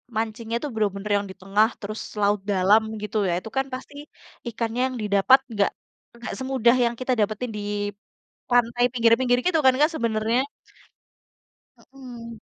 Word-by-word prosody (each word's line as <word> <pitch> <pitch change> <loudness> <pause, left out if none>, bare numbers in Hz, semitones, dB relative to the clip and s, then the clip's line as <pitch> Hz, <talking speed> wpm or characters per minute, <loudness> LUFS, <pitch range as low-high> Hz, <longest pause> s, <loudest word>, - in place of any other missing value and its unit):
mancingnya 225 +1 -3
itu 295 - -4
bener-bener 205 -1 -1
yang 200 - -3
di - - -12
tengah 200 +3 +3
terus 215 0 -6 0.2
laut 205 +1 +2
dalam 200 +3 +4 0.2
gitu 210 +1 -3
ya, 175 - +1
itu 220 - -9
kan 270 - +2
pasti 260 +2 -7 0.6
ikannya 230 +2 -2
yang - - -6
didapat 210 +5 +5
nggak 205 -1 +2 0.5
nggak 235 - -6
semudah 260 -2 +2
yang 235 0 -1
kita 255 0 0
dapetin 215 +3 -1
di - - -4 0.9
pantai 245 0 +3
pinggir-pinggir 245 +1 +3
gitu 345 -3 +3
kan 260 - +6
Kak, 300 +2 +5
sebenarnya? 230 +1 0 1.5
Mhm. 240 -4 -10
230 Hz, 150 wpm, -24 LUFS, 210-250 Hz, 1.5 s, kan